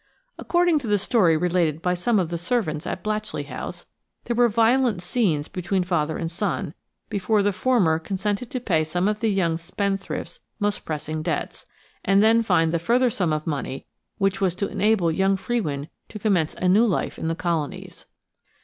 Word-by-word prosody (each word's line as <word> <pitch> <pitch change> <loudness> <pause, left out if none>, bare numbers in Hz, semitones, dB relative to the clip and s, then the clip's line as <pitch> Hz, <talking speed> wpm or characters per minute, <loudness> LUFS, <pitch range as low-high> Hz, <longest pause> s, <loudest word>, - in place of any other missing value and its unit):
According 345 -3 +2
to 255 - -6
the 210 -1 +3
story 185 -5 +3
related 170 -2 +1
by 180 +1 0
some 195 +6 +1
of 180 -4 +1
the 170 - -1
servants 175 -5 -1
at - - -4
Blatchley 215 0 -2
House, - - -7 0.4
there 235 - -1
were 240 0 +4
violent 230 -1 +3
scenes 175 -8 0
between 185 +1 -1
father 160 -4 0
and 165 -1 -3
son 175 -4 -2 0.3
before 205 +1 +1
the 205 0 +1
former 185 -9 +2
consented 205 +6 -3
to 255 - -3
pay 170 -10 +1
some 175 +4 -1
of 210 0 0
the 225 - 0
young 175 -5 +1
spendthrift's 195 - -3 0.2
most 205 -1 -1
pressing 155 0 -4
debts, - - -3 0.4
and 195 +1 +4
then 225 +1 +5
find 170 -7 +2
the 170 - 0
further 240 +7 +2
sum 180 -6 0
of 155 0 -1
money 140 -3 -4 0.3
which 195 -1 0
was 185 -3 +1
to 200 +2 -1
enable 205 -6 +2
young 195 +3 +2
Frewin 155 -11 -2 0.2
to 215 - -7
commence 190 -7 +1
a 180 - -1
new 210 +6 +5
life 195 - -1
in - - -2
the 165 - 0
colonies. 165 -4 -4
190 Hz, 185 wpm, -24 LUFS, 165-215 Hz, 0.4 s, then